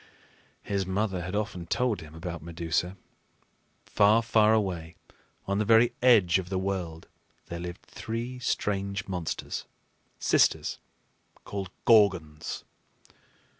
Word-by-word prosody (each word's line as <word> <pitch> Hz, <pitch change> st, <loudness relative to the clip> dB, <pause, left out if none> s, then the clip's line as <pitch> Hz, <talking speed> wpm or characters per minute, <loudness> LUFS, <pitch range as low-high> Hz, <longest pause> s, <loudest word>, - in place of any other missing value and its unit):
His 100 Hz, -1 st, -1 dB
mother 95 Hz, 0 st, -1 dB
had 90 Hz, +3 st, -4 dB
often 105 Hz, -5 st, -3 dB
told 125 Hz, 0 st, 0 dB
him 80 Hz, 0 st, -12 dB
about 85 Hz, -1 st, -6 dB
Medusa. 85 Hz, +3 st, -2 dB, 0.9 s
Far, 105 Hz, +3 st, +4 dB
far 110 Hz, -1 st, +4 dB
away, 90 Hz, -7 st, 0 dB, 0.5 s
on 100 Hz, +1 st, 0 dB
the -, -, +2 dB
very 115 Hz, +2 st, +5 dB
edge 105 Hz, -9 st, +5 dB
of 90 Hz, -1 st, -6 dB
the 95 Hz, -, -1 dB
world, 95 Hz, -4 st, -3 dB, 0.4 s
there 85 Hz, -, -5 dB
lived 85 Hz, 0 st, -7 dB
three 120 Hz, +3 st, -5 dB
strange 100 Hz, -4 st, -1 dB
monsters, 90 Hz, -4 st, -4 dB, 0.5 s
sisters, -, -, +2 dB, 0.6 s
called 100 Hz, -2 st, -5 dB, 0.2 s
Gorgons. 90 Hz, -9 st, +3 dB
95 Hz, 115 wpm, -28 LUFS, 85-105 Hz, 0.9 s, very